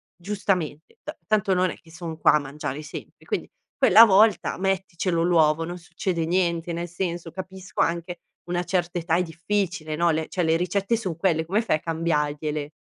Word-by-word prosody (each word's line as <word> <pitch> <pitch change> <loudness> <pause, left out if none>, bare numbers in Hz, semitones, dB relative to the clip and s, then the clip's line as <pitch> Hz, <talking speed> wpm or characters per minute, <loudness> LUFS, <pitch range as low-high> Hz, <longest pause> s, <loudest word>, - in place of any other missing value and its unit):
giustamente, 180 -5 -3
ta - - -7
tanto 210 -2 +2
non 185 0 +2
è - - -8
che 165 - -18
son 165 -1 -7
qua - - +5
a 150 - +4
mangiare 145 0 -5
sempre, 150 - -10
quindi - - -3 0.3
quella 215 +5 +8
volta, 210 0 +4
metticelo 185 -3 -1
l'uovo, 165 -2 +3
non 175 +2 -5
succede 170 0 -3
niente. 170 -1 0
Nel 170 +1 -3
senso, 175 -1 -4
capisco 190 +1 -5
anche 170 +1 -1 0.3
una 175 0 -1
certa 180 -1 -1
età, 165 -1 0
è 180 - +2
difficile, 175 -1 -2
no, 170 +1 +3
le 160 0 -1
cioè, 180 - -1
le 160 0 +3
ricette 195 +6 0
son 185 -8 -4
quelle, 165 -3 +1
come 195 +6 +1
fai 225 -9 +1
a - - -15
cambiargliele?" 150 -2 -1
170 Hz, 180 wpm, -24 LUFS, 160-185 Hz, 0.3 s, quella